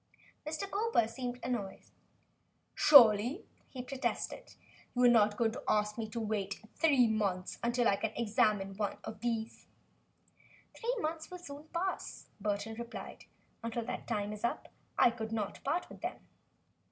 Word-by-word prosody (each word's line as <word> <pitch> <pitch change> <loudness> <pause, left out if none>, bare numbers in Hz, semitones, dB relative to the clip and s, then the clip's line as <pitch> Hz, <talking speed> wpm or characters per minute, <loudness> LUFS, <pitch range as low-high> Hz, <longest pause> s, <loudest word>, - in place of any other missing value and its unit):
Mr. 315 +6 -3
Cowper 410 - +2
seemed 245 +1 -5
annoyed. 215 -6 -3 0.9
"Surely," 240 -3 +7 0.2
he 255 -2 -6
protested, 265 +1 -3 0.4
"you 250 - +3
are - - +8
not 215 -3 +5
going 230 -2 +2
to 225 - -7
ask 210 0 +2
me 225 -2 -4
to 230 +2 -4
wait 210 -3 -2 0.2
three 280 -7 +5
months 200 -4 -1
until 240 0 +2
I 200 - +3
can 220 - -2
examine 210 -3 +1
one 205 -1 -1
of 215 - -7
these?" 230 -1 -3 1.1
"Three 480 +2 -1
months 315 -1 -3
will 360 - -7
soon 290 -4 -10
pass," 350 +4 -4
Burton 210 +2 -2
replied. 235 0 -7 0.4
"Until 230 0 -3
that 250 - -5
time 210 -2 -1
is 210 - -9
up, 235 - -2 0.3
I 240 - +6
could 225 -2 -5
not 215 -3 -3
part 315 +6 0
with - - -13
them." - - -4
230 Hz, 155 wpm, -33 LUFS, 210-260 Hz, 1.1 s, are